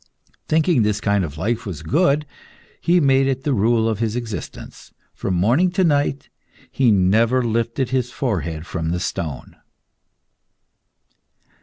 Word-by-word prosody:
Thinking 160 -3 +2
this 105 -1 +1
kind 100 -2 +1
of 75 -3 -6
life 110 +8 -1
was 85 -6 -7
good, 150 - +2 0.6
he 175 +1 +3
made 135 -3 +3
it 135 -1 -2
the 145 - 0
rule 115 +1 +2
of 110 -2 -1
his 115 -1 -1
existence. 115 -4 -7 0.2
From 95 - -3
morning 120 - +3
to 190 - +2
night 145 -4 +1 0.4
he 130 -3 +2
never 110 +6 +3
lifted 115 +2 -1
his 130 -2 0
forehead 85 - -3
from 85 -2 -3
the 90 +1 -1
stone. 85 -6 -5
115 Hz, 140 wpm, -21 LUFS, 95-135 Hz, 0.6 s, he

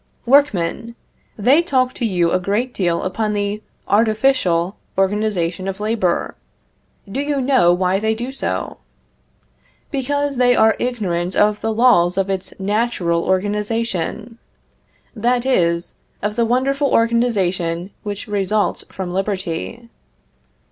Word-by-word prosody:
Workmen! 235 -4 +2 0.4
They 255 +10 +4
talk 260 -7 +1
to 240 - -3
you 175 -4 +1
a 185 - +2
great 210 +7 -1
deal 175 -3 0
upon 210 +3 -1
the 205 +1 -2 0.3
artificial 210 -5 +2 0.2
organization 190 -3 0
of 195 0 -4
labor; 210 -5 0 0.7
do 195 +7 -4
you 285 -1 -1
know 255 -9 +4
why 185 +2 +1
they 220 +1 0
do 240 +4 -5
so? 270 - -3 1.1
Because 285 0 -1
they 245 0 +4
are 220 -1 +4
ignorant 190 -8 -2
of 210 0 +2
the 225 - -1
laws 215 -7 +4
of 195 0 0
its 190 0 -3
natural 195 -5 0
organization; 210 +2 -2 0.8
that 240 +2 +1
is, 170 -9 +1 0.3
of 210 +1 -1
the 235 -1 +2
wonderful 275 +4 +1
organization 195 -7 +1
which 205 -1 -6
results 205 -1 0
from 185 -2 -5
liberty. 195 +4 -3
210 Hz, 120 wpm, -19 LUFS, 185-240 Hz, 1.1 s, They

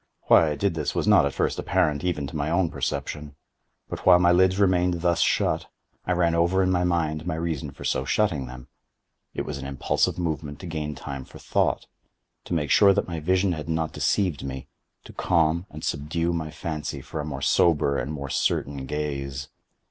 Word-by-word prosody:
Why 80 - +5
I 75 - -2
did 95 +5 0
this 75 -3 -3
was - - 0
not - - +6
at - - -5
first - - 0
apparent 80 -6 +1
even 85 -6 -1
to 70 - -8
my 75 0 -1
own 85 0 +1
perception. 75 -1 -4 0.5
But - - -6
while 90 -1 +7
my 90 0 +4
lids 95 +1 +4
remained 90 -3 +2
thus 85 -1 +2
shut, - - +1 0.4
I 90 - +2
ran 85 -1 +2
over 85 +3 +2
in 95 - +2
my 90 -1 +2
mind 80 -2 0
my 90 - -1
reason 80 -3 -3
for 70 - -11
so 65 - 0
shutting 75 -4 0
them. 65 0 -10 0.7
It - - -2
was - - -5
an - - -6
impulsive 70 -1 0
movement 75 -4 -3
to - - -8
gain 75 -3 -4
time 70 0 -6
for - - -14
thought—to - - -4
make 75 -4 -1
sure 100 -2 +6
that - - 0
my 85 -2 -4
vision 95 +4 +2
had 80 -2 -4
not 80 -1 -1
deceived 90 -8 0
me—to 65 -1 -10
calm 85 +1 +1
and 75 +1 -10
subdue 85 +3 -1
my 80 -2 -3
fancy 75 -1 -5
for 80 - -6
a - - -2
more 75 -1 -5
sober 75 -4 +3
and 70 - -3
more 70 -3 -5
certain 70 -1 -1
gaze. 70 -2 -4
80 Hz, 195 wpm, -25 LUFS, 75-90 Hz, 0.7 s, while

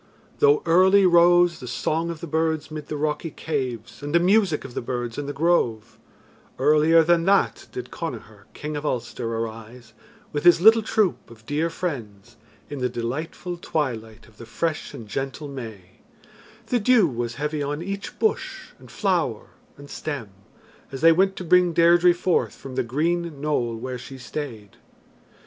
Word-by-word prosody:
Though 435 0 +4
early 190 +3 +5
rose 175 0 +5
the 125 - -8
song 160 +7 -1
of 165 -2 -6
the - - -4
birds 160 -1 -1
mid 155 -1 -7
the 150 - -4
rocky 150 +2 -2
caves 130 -8 -4
and 145 +3 -3
the - - +6
music 185 -4 +2
of 130 - -9
the - - -3
birds 120 0 -4
in 145 - -4
the - - -2
grove, 135 -8 0 0.6
earlier 155 +2 +5
than 170 0 +2
that 195 +1 +2
did 125 0 -7
Connachar, 110 -9 -7
King 150 0 -5
of 145 - -4
Ulster, 120 -4 -3
arise, 115 +1 -6 0.4
with 145 0 -2
his 175 -1 +7
little 220 +5 +7
troop 215 -3 0
of 110 -1 -16
dear 155 +5 -1
friends, 120 - -6 0.3
in 145 - -6
the 125 0 0
delightful 145 +9 -4
twilight 120 -10 -4
of 110 -1 -22
the 115 - -11
fresh 155 +4 -3
and 115 -5 -9
gentle 135 +6 -4
May; 110 -9 -9 0.7
the 245 +2 0
dew 225 -3 +4
was 120 -3 -4
heavy 150 +1 -3
on 145 +3 -3
each 200 +2 -6
bush 385 -3 -2
and - - -15
flower 170 - -1 0.3
and 145 0 -12
stem, 140 -8 -5 0.6
as 135 -1 -7
they 165 - +7
went 190 +3 +2
to - - -6
bring 180 0 +4
Deirdre 175 +1 +5
forth 175 0 0
from 135 - -10
the 130 - 0
green 160 +5 -1
knoll 130 -6 -1
where 125 +2 -5
she 135 +2 -10
stayed. 125 -6 -7
150 Hz, 170 wpm, -24 LUFS, 120-170 Hz, 0.7 s, his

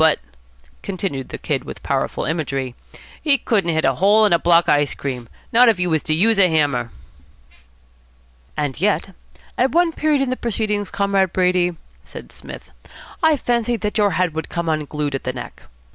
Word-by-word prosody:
but," 160 -1 +5 0.6
continued 185 -9 -4
the - - -6
Kid - - -2
with - - -10
powerful - - -1
imagery, 135 -6 -2 0.5
"he 285 -3 +3
couldn't 205 -9 0
hit 160 -2 +1
a 135 - +3
hole 205 - +4
in 205 - +3
a 170 - +4
block 170 0 +4
of - - +5
ice 145 -1 +1
cream, 125 -4 -5 0.2
not 240 +1 +6
if 220 - +2
he 180 - +1
was 160 -3 +1
to 155 - 0
use 215 +5 +3
a 185 -2 +5
hammer." 145 -7 +1 1.7
"And 145 0 -3
yet 195 -1 0 0.5
at 260 +2 +2
one 340 0 +3
period 300 -3 +1
in 260 - -2
the - - 0
proceedings, 210 -4 -2
Comrade 200 -2 +1
Brady," 180 -1 +1 0.3
said - - -11
Psmith, - - -11 0.5
"I 320 -2 +4
fancied 240 -2 -1
that 210 +1 -2
your 205 -2 +3
head 180 -3 +1
would 160 +1 -5
come 170 -1 -3
unglued 150 -2 -2
at 135 - -3
the 130 - -3
neck. 125 - -9
180 Hz, 185 wpm, -20 LUFS, 155-215 Hz, 1.7 s, not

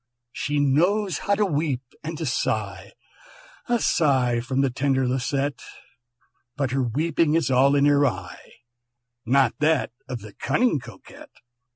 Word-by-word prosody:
"She 145 +3 -2
knows 180 +8 +2
how 200 - +5
to 210 0 +1
weep 145 -6 -1 0.2
and 160 +1 -5
to 160 - -4
sigh," 130 - -2 0.8
(A 240 - +3
sigh 130 - +2
from 130 +3 -1
the 135 -2 +1
tender 130 0 0
Lisette), 135 +2 -1 1.0
"But 140 -4 -1
her 135 +1 0
weeping 150 +5 +1
is 160 -6 +1
all 135 +2 +4
in 140 - +3
my 145 -1 +4
eye, - - -10 0.7
Not 130 -1 +3
that 155 -4 +1 0.2
of 125 -4 -5
the 105 0 -11
cunning 240 - +1
Coquette! 115 -6 -13
140 Hz, 145 wpm, -24 LUFS, 130-155 Hz, 1.0 s, how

